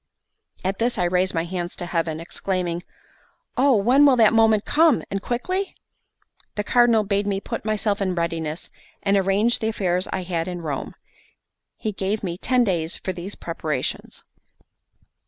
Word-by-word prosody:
At 190 +1 -1
this 235 +1 +1
I 180 - +1
raised 180 +1 +1
my 165 - +1
hands 175 0 -4
to 175 - -5
heaven, 165 -2 -1
exclaiming: 175 0 -2 0.7
"Oh, 270 0 +4
when 245 +8 +4
will 280 -3 +7
that 225 -3 +5
moment 220 -2 +4
come, 320 0 +4
and 195 0 -2
quickly?" 370 - -2 0.8
The 210 - -1
Cardinal 235 -1 +4
bade 200 0 0
me 195 -1 0
put - - -5
myself 210 -1 0
in 185 -2 0
readiness, 165 -1 -3 0.3
and 200 0 +3
arrange 200 +4 +2
the 220 - -1
affairs 185 -4 0
I 190 - -2
had 170 -1 -2
in 175 -2 -5
Rome. 145 -4 -4 0.8
He 215 - -2
gave 200 +2 -2
me 175 -3 -2
ten 250 +6 +2
days 175 -6 0
for 185 - -4
these 180 +3 -7
preparations. 155 -5 -4
195 Hz, 160 wpm, -23 LUFS, 175-220 Hz, 0.8 s, will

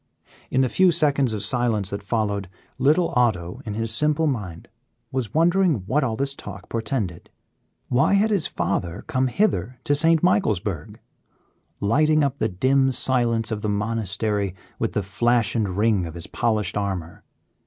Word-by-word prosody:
In 130 - +2
the 130 - +3
few 185 +8 +3
seconds 140 -6 +2
of 105 -2 -3
silence 110 -4 +2
that 100 0 -4
followed, 100 -2 -2 0.3
little 155 +6 +3
Otto, 100 -9 0
in 105 - -3
his 115 0 -1
simple 150 +5 +1
mind, 105 - -3 0.4
was 130 -5 -2
wondering 170 - +3
what 145 +7 +1
all 115 -4 -1
this 135 +3 -1
talk 100 -7 -10
portended. 115 - -3 0.6
Why 135 +10 +3
had 215 +2 +2
his 195 -7 +2
father 85 -1 -3
come 130 0 0
hither 125 - 0
to 145 - +1
St. 165 +2 +3
Michaelsburg, 105 - 0 0.8
lighting 155 +8 +3
up 140 0 -1
the 110 - +1
dim 130 +8 +2
silence 120 -3 0
of 105 -1 -3
the 105 - -2
monastery 105 -2 -1 0.2
with - - -1
the 105 - -1
flash 115 +3 +1
and 100 -5 -1
ring 105 -5 +2
of 80 - -9
his 85 - -6
polished 110 -4 -1
armor? 95 -5 -4
115 Hz, 160 wpm, -23 LUFS, 100-140 Hz, 0.8 s, the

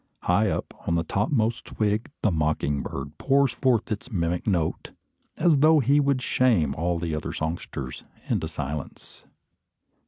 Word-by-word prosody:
High 100 +4 +3
up, - - -3
on 85 - +2
a 85 - 0
topmost 110 - 0
twig, 105 +1 -1
the 105 - +3
mocking 75 -3 0
bird 70 +3 -6
pours 140 -1 +3
forth 125 -3 +1
his 110 +4 -4
mimic 85 -2 -1
note, 85 -6 0 0.5
as 160 -5 +4
though 155 +2 +6
he 140 +3 +3
would 140 -3 +1
shame 105 - +2
all 85 +3 -1
other 80 -2 -3
songsters 80 -5 -4 0.2
into 80 - 0
silence. 75 -2 -7
95 Hz, 145 wpm, -25 LUFS, 80-125 Hz, 0.5 s, though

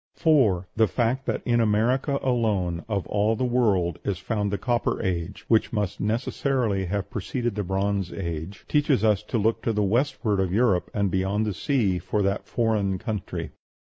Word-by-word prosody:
4. 115 - +3
The 110 -1 +4
fact 125 +5 -1
that - - -1
in 120 -1 +2
America 120 +6 +2
alone 105 -9 0
of 100 -3 -1
all 105 +2 +1
the 130 - -1
world 105 -10 +1
is 100 -3 -1
found 105 +1 -2
the 100 - 0
Copper 120 +4 0
Age, 90 -1 -3
which 110 -1 +3
must 105 -4 -2
necessarily 115 -1 0
have 100 +2 -3
preceded 120 +4 -2
the 105 0 -2
Bronze 95 0 -1
Age, 85 +1 -5
teaches 145 -6 +2
us 105 -3 +3
to 120 - -3
look 110 +1 +1
to 115 - 0
the 105 -1 +1
westward 110 -1 +1
of 95 -2 0
Europe 100 -3 +2
and 100 -3 0
beyond 95 +3 0
the 105 - -1
sea 95 - 0
for 100 +4 -1
that 100 +1 -1
foreign 105 -5 0
country. 105 0 -4
105 Hz, 175 wpm, -25 LUFS, 95-120 Hz, -, The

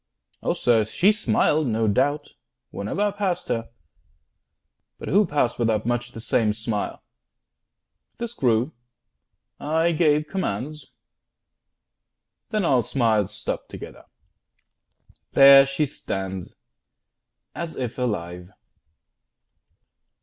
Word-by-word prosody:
Oh - - 0
sir, 115 -3 +3
she 175 - +3
smiled, 155 -8 +1
no 110 -1 0
doubt, 145 +8 +1 0.4
Whene'er 105 - -4
I 205 0 +2
passed 200 -3 -2
her; 115 -1 -2 1.3
but - - -7
who 205 0 +4
passed 145 -7 0
without 110 -2 +1
Much 120 0 -2
the - - -8
same 110 -1 +1
smile? 110 -1 -4 1.1
This 235 0 -5
grew; 125 - +1 0.9
I 160 +3 +1
gave 155 -2 +2
commands; 150 - -4 1.6
Then 215 -4 0
all 130 -6 +3
smiles 110 -5 +1
stopped - - -5
together. - - -10 1.3
There 135 0 +8
she 140 +2 0
stands 95 -9 -6 1.0
As 170 -1 -6
if 125 -1 -4
alive. 90 -7 -3
130 Hz, 100 wpm, -24 LUFS, 110-155 Hz, 1.6 s, There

